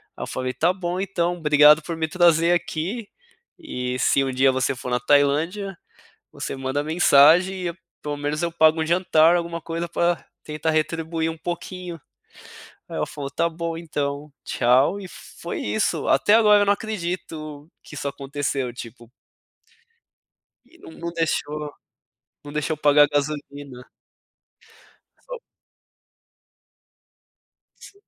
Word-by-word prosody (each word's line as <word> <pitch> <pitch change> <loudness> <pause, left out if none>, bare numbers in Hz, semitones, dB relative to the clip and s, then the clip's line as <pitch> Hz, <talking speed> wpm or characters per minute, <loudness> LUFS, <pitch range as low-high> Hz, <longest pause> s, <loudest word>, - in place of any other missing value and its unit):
ai - - -6
eu - - -5
falei, 130 0 -3
"Tá 175 +3 +2
bom 180 -1 -3
então, 175 -2 -1
obrigado 150 -1 +6
por 165 +1 -5
me 160 0 -1
trazer 170 -1 +4
aqui, 180 +6 -2 0.5
e 125 - -4
se 135 - +3
um 135 - -2
dia 130 +1 +3
você 130 +1 0
for 125 0 -7
na 125 - +1
Tailândia, 155 +9 +1 0.5
você - - -5
manda 135 +2 -2
mensagem 175 +4 +4
e 170 - -5 0.3
pelo 145 -1 -4
menos 145 +2 -2
eu 170 -1 -1
pago 160 -1 +4
um - - -3
jantar, 170 -1 +4
alguma 170 -1 -4
coisa 165 +1 -4
pra 170 +1 0 0.2
tentar 155 +1 -2
retribuir 160 +1 -1
um 160 - -8
pouquinho". 175 +1 -6 0.9
Aí - - -7
ela - - 0
falou: 140 -2 -7
"Tá 170 - 0
bom 165 0 -4
então, 145 -3 -4
tchau" 130 +11 +2
e 190 - -8
foi 390 - -8
isso, 220 -5 -1
até 205 - +3
agora 210 -2 +6
eu 205 - +3
não 200 - +4
acredito 170 -7 -6
que - - -14
isso 140 - -4
aconteceu, 140 -2 -3
tipo 120 -1 -11 1.6
E 345 - -20
não - - -12
não 170 +1 -6
deixou, 150 -3 -2 0.7
não 145 - -8
deixou 150 +1 -1
eu 155 - -25
pagar 145 0 +6
gasolina. 145 -3 -4 1.4
Foi - - -7 2.4
S - - -13
160 Hz, 140 wpm, -23 LUFS, 145-175 Hz, 2.4 s, obrigado